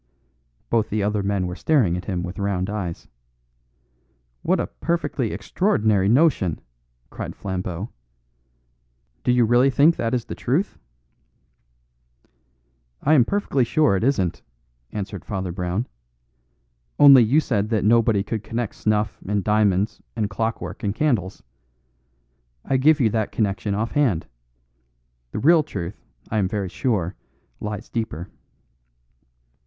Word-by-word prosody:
Both 110 -2 +2
the 105 0 -1
other 105 0 0
men 100 -1 0
were 90 0 -4
staring 120 - +2
at 90 - -5
him 90 -4 -2
with 90 +3 -6
round 100 -1 -1
eyes. 95 -6 -5 1.3
"What - - +1
a - - 0
perfectly 150 -8 -2
extraordinary 105 - +1
notion!" 120 - +3 0.5
cried - - -6
Flambeau. 95 +1 -4 1.3
"Do - - +2
you 125 -1 +4
really 120 +4 +4
think 145 +5 +4
that 115 +2 0
is 120 - -2
the - - -6
truth?" 160 - -1 2.2
"I 150 - +4
am 130 -6 +6
perfectly 200 -9 0
sure 150 -2 +2
it 95 - -1
isn't," 100 -10 0 0.5
answered 100 -2 -5
Father 95 -3 -4
Brown, 90 +5 -2 1.1
"only 140 -3 +9
you 130 +8 +4
said 110 -8 -1
that 110 -3 0
nobody 110 -2 +4
could 110 +1 -4
connect 115 +1 -3
snuff 105 -1 -1
and 100 -1 0
diamonds 105 -1 +1
and 105 -3 -1
clockwork 110 +4 -3
and 100 -3 -2
candles. 115 - 0 1.2
I 135 - +1
give 155 +4 +4
you 115 -5 +3
that 110 -1 -1
connection 100 -1 -1
off 110 +3 -2
hand. 120 - +1 1.0
The - - -6
real 160 +8 +5
truth, 100 - -6 0.3
I 110 - +1
am 95 - +1
very 100 -1 -3
sure, 100 -5 -1 0.5
lies 105 -1 -5
deeper." 95 -7 -4
105 Hz, 130 wpm, -23 LUFS, 95-125 Hz, 2.2 s, only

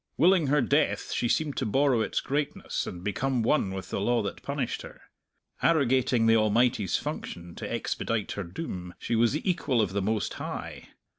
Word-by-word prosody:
Willing 170 0 +4
her 145 +1 +3
death, 145 +5 +1
she 120 - 0
seemed 150 +1 0
to - - 0
borrow 130 +1 +3
its - - -1
greatness 145 +1 -2
and 90 0 -7
become 125 +4 0
one 115 -4 +2
with 95 0 -6
the - - -1
law 120 +3 +2
that - - -5
punished - - -3
her. - - -11 0.6
Arrogating 130 -6 +3
the 115 0 +6
Almighty's 110 -4 +2
function 85 0 -6
to - - -6
expedite 110 -3 -2
her 100 - -3
doom, 90 - -6
she 115 - -2
was 115 +2 +3
the 155 - -3
equal 155 -9 +1
of 100 -4 +1
the 100 - 0
Most 105 0 -1
High. - - -6
120 Hz, 180 wpm, -28 LUFS, 100-140 Hz, 0.6 s, the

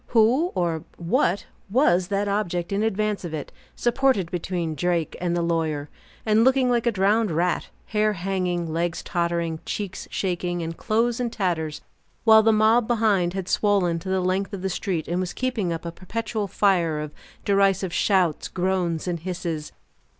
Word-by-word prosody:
Who 255 +11 +4
or 170 -3 0
what 170 +2 +1 0.2
was 185 -6 +3
that 200 +1 0
object 180 -4 -1
in 200 +1 0
advance 215 -1 0
of 165 -3 -4
it, 150 - -6 0.2
supported 240 -7 +1
between 175 -2 -2
Drake 170 +1 -1
and 175 -1 0
the 170 - 0
lawyer, 160 -3 -1 0.4
and 220 0 +4
looking 260 0 +4
like 240 -1 +1
a - - +4
drowned 210 +2 +2
rat, 175 +2 0 0.2
hair 215 0 +1
hanging, 180 -3 -2
legs 170 0 -1
tottering, 170 -2 -1
cheeks 200 -3 -5
shaking, 175 -2 -2
and 165 0 -4
clothes 230 +5 0
in 245 -1 0
tatters, 170 -8 -2 0.4
while 220 -1 +8
the 225 +1 +4
mob, 220 +2 +4
behind, 210 -7 +2
had 190 -2 -3
swollen 185 -5 +2
to 190 - -7
the 190 0 +1
length 190 +3 -1
of 190 -2 -5
the 190 - 0
street, 180 -3 -2
and 175 +2 -1
was 185 -1 -2
keeping 240 -9 -1
up 165 0 -4
a 170 - -3
perpetual 215 +4 -4
fire 175 -6 +2
of 150 -1 -5 0.3
derisive 195 -2 +2
shouts, 185 -6 +2
groans, 180 -3 -1
and 175 -2 -1
hisses. 170 -3 -4
185 Hz, 170 wpm, -24 LUFS, 170-215 Hz, 0.4 s, while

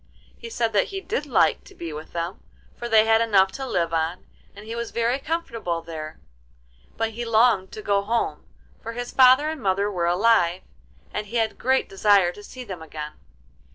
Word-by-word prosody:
He 465 - -9
said 230 - -1
that 200 - +3
he 390 - -5
did 415 +4 -3
like - - +2
to 390 - -16
be 165 - -6
with 155 +1 -8
them, 170 +2 -4 0.4
for 240 - -6
they 220 -1 +6
had 225 0 +4
enough 195 -4 +4
to 270 -1 -6
live 170 -7 -1
on, 165 +2 -1 0.3
and 205 +1 -11
he 225 - -6
was 235 0 -4
very 235 +3 0
comfortable 230 - -3
there; 155 -2 -7 0.8
but 225 0 -1
he 235 +2 -5
longed 225 -4 +3
to 215 - -8
go 200 -1 +2
home, 230 +4 -1 0.4
for 230 - -6
his 245 +1 -5
father 260 +3 +6
and 315 - -7
mother 200 +1 +1
were 175 -3 -1
alive, 180 -1 +3 0.5
and 210 - -3
he 230 - -8
had 225 -2 +2
a - - -21
great 265 +1 +1
desire 195 -2 +3
to 205 - -12
see 255 +4 -9
them 190 -7 -8
again. 150 -1 -7
215 Hz, 200 wpm, -24 LUFS, 180-235 Hz, 0.8 s, they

